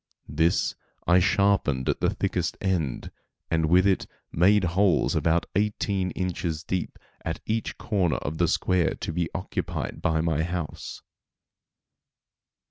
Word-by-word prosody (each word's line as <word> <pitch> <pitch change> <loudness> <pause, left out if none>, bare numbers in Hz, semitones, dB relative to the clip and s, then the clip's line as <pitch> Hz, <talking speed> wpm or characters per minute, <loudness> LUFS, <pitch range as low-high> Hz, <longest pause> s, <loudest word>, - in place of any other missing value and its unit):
This 80 +4 +2 0.3
I 90 +2 +5
sharpened 90 -9 +2
at - - +1
the - - +3
thickest - - -1
end, 85 -9 -1 0.4
and 80 -1 +2
with 90 +3 +5
it 95 -2 +2 0.2
made 100 +4 +4
holes 90 +1 +2
about 85 +1 +2
eighteen 100 -2 0
inches 85 -3 -2
deep 90 +1 -3 0.3
at 80 0 -3
each 110 +1 -2
corner 95 -7 0
of 80 +2 -4
the 85 - +3
square 90 +1 +1
to 80 - -5
be 85 -1 -1
occupied 95 - -4
by 80 0 +1
my 80 -2 +1
house. 85 -2 -4
90 Hz, 130 wpm, -26 LUFS, 80-95 Hz, 0.4 s, I